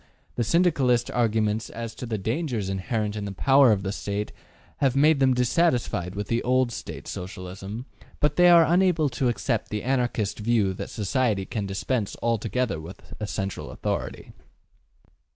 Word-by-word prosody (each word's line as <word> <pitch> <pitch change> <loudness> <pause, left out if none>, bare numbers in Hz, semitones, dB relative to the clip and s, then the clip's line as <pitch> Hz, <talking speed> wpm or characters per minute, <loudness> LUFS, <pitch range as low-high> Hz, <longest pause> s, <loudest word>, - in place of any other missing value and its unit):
The 120 - -1
Syndicalist 130 -6 +2
arguments 110 -2 0
as 115 -1 -6
to 125 - -7
the 110 -2 -2
dangers 115 - -2
inherent 105 +2 -2
in 105 -1 -4
the 100 - -4
power 135 +5 +5
of 100 -2 +1
the 95 - -2
State 100 +1 -3 0.5
have 135 -2 +1
made 150 +1 +4
them 130 -2 +4
dissatisfied 125 - +1
with 105 0 -4
the 115 0 0
old 130 0 +2
State - - -7
Socialism, 95 +5 -7 0.3
but 150 0 +1
they 180 0 +6
are 170 -1 +8
unable 175 -3 +3
to 130 -1 0
accept 115 -1 -1
the 105 -1 -3
Anarchist 120 -6 0
view 105 -3 +1
that - - -6
society 105 -1 0
can 105 -1 -3
dispense 100 +2 -2
altogether 115 -4 0
with 85 +5 -11
a 105 - -3
central 100 -1 -4
authority. - - -4
115 Hz, 160 wpm, -25 LUFS, 100-130 Hz, 0.5 s, are